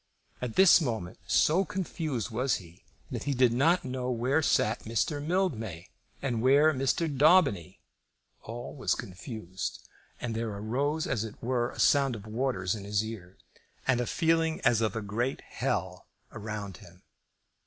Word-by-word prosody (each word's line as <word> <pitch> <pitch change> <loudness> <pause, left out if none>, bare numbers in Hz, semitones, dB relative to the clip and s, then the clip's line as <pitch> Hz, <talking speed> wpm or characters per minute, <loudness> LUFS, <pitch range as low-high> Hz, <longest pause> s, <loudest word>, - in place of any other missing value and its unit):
At 125 -3 -4
this 190 -2 +7
moment, 110 - -3
so 170 +6 +4
confused 155 - -3
was 125 +4 +1
he, 85 -1 -11 0.3
that - - -4
he 140 -1 0
did 125 -2 +4
not 160 +8 +3
know 125 -1 -3
where 125 +5 +1
sat 110 -6 +2
Mr. 130 +6 -1
Mildmay, 115 - -2 0.3
and 120 -5 -1
where 140 +5 +5
Mr. 135 +5 0
Daubeny. 140 - +3 0.6
All 120 +5 -7
was 130 - 0
confused, 95 - -6 0.3
and 120 -2 -3
there 115 0 -2
arose 140 +9 -1
as 110 - -1
it 110 -2 -7
were 120 0 0
a - - -11
sound 135 -3 +4
of 105 -2 -9
waters 110 -5 -1
in 105 - -6
his 105 +1 0
ears, 95 -5 -9 0.5
and 125 -2 +2
a 120 - -2
feeling 165 -1 +1
as 115 -2 +3
of 110 -2 0
a 110 - -3
great 115 +6 -2
hell - - -3 0.2
around 105 -3 -6
him. 90 +2 -17
120 Hz, 155 wpm, -29 LUFS, 110-145 Hz, 0.6 s, this